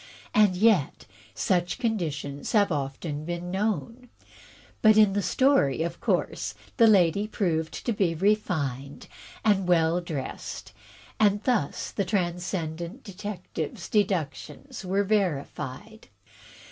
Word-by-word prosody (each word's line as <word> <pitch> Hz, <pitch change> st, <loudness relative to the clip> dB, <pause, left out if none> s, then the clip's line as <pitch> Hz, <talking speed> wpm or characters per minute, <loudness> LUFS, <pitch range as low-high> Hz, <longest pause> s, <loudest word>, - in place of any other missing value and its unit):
And 210 Hz, -3 st, +4 dB
yet, 195 Hz, -7 st, +2 dB, 0.3 s
such 175 Hz, -, 0 dB
conditions 155 Hz, -, -3 dB
have 205 Hz, -3 st, +4 dB
often 145 Hz, +1 st, -3 dB
been 175 Hz, +2 st, -4 dB
known. 225 Hz, +5 st, -2 dB, 0.7 s
But 215 Hz, -1 st, +6 dB
in 210 Hz, -2 st, +6 dB
the 205 Hz, -, +1 dB
story, 230 Hz, -, +2 dB
of 170 Hz, 0 st, -4 dB
course -, -, -1 dB, 0.2 s
the 230 Hz, -3 st, +7 dB
lady 200 Hz, 0 st, +4 dB
proved 165 Hz, -7 st, -2 dB
to 235 Hz, -, +1 dB
be 190 Hz, -6 st, +1 dB
refined 155 Hz, -9 st, -1 dB, 0.4 s
and 195 Hz, -4 st, +3 dB
well 170 Hz, 0 st, +3 dB
dressed, 155 Hz, -6 st, -6 dB, 0.5 s
and 205 Hz, -1 st, +3 dB
thus 235 Hz, -, 0 dB
the 200 Hz, -, -1 dB
Transcendant 175 Hz, -, -3 dB
Detective's 190 Hz, -5 st, -6 dB
deductions 200 Hz, -, -2 dB
were 195 Hz, +2 st, +1 dB
verified. 195 Hz, -, -2 dB
185 Hz, 110 wpm, -27 LUFS, 160-210 Hz, 0.7 s, the